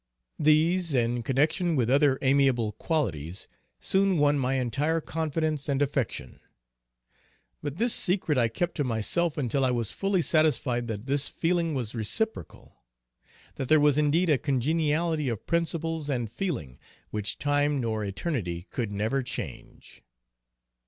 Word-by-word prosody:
These, 160 +2 +3
in 120 0 +1
connection 155 - +1
with 125 -5 +1
other 140 +1 +3
amiable 130 -5 +3
qualities, 100 - -3 0.3
soon 195 -1 +2
won 145 -1 +3
my 130 0 0
entire 140 +6 0
confidence 155 -2 -2
and 135 -1 +1
affection. 135 - -2 1.2
But 145 +1 -5
this 235 +2 +3
secret 180 -4 +1
I 120 -3 +3
kept 170 +10 -2
to 145 - +1
myself 130 +8 0
until 135 -1 0
I 130 - +3
was 120 -3 -1
fully 195 -3 0
satisfied 130 -7 +2
that 110 -1 -5
this 140 +1 +2
feeling 170 -2 0
was 120 -5 -3
reciprocal; 115 - -4 0.8
that 130 - -4
there 155 - +6
was 145 -1 +4
indeed 155 +3 +2
a 140 - +3
congeniality 150 +2 0
of 115 -4 -5
principles 165 -2 -1
and 120 -6 -2
feeling, 120 - -4 0.3
which 105 -1 -3
time 145 0 +1
nor 110 -3 -2
eternity 95 - -3
could 115 -5 -3
never 110 +7 0
change. 125 - -8
140 Hz, 140 wpm, -27 LUFS, 120-160 Hz, 1.2 s, there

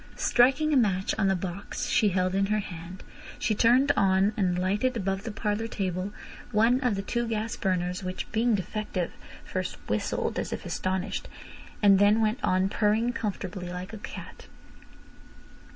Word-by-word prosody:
Striking 270 +6 +3
a - - +5
match 195 -6 +2
on 195 - +3
the 190 - +3
box 180 +2 -4
she 215 - +3
held 185 0 0
in 195 0 +2
her 210 +1 +1
hand, 180 -2 -7 0.3
she 220 - 0
turned 240 +6 +4
on 195 +1 +3
and 180 -3 +1
lighted, 205 +7 0
above 195 -2 -1
the 225 - -3
parlour 210 +1 -2
table, 190 -2 -3 0.4
one 230 +3 +4
of 250 -5 +1
the 195 - -3
two 235 +3 -1
gas 225 0 -2
burners, 180 -1 -1
which, 185 0 -4
being 230 0 +2
defective, 195 -2 -3 0.3
first - - -3
whistled - - -1
as - - -3
if - - -5
astonished, 190 +2 -2 0.6
and 195 -2 +7
then 205 +2 +5
went 220 +3 0
on 185 +1 +2
purring 220 +4 +1
comfortably 190 -5 -4
like 180 +3 -6
a 220 - -6
cat. - - -9
200 Hz, 165 wpm, -27 LUFS, 185-225 Hz, 0.6 s, and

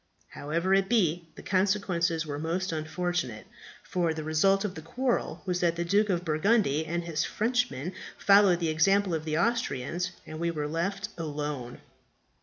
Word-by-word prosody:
However 170 +6 -1
it 195 0 +3
be, 175 -7 +2
the - - -11
consequences 185 -4 +1
were 145 -1 -4
most 170 +4 -2
unfortunate, 160 -6 -2 0.4
for 170 -3 -1
the 155 - -4
result 195 +6 +2
of 195 - -3
the 160 - -8
quarrel 245 +9 -2
was 180 -2 -1
that 170 -2 +2
the 170 0 -2
Duke 205 +4 +2
of 180 -2 0
Burgundy 160 -2 +2
and 170 +1 -2
his 165 -2 -1
Frenchmen 215 - -1 0.2
followed 200 -3 +5
the 165 -2 0
example 195 +4 +3
of 160 -1 -2
the 155 -1 -1
Austrians, 175 - 0 0.2
and 155 - -8
we 170 0 0
were 150 -3 -2
left 195 +6 -2
alone. 145 -5 -4
170 Hz, 165 wpm, -28 LUFS, 155-195 Hz, 0.4 s, followed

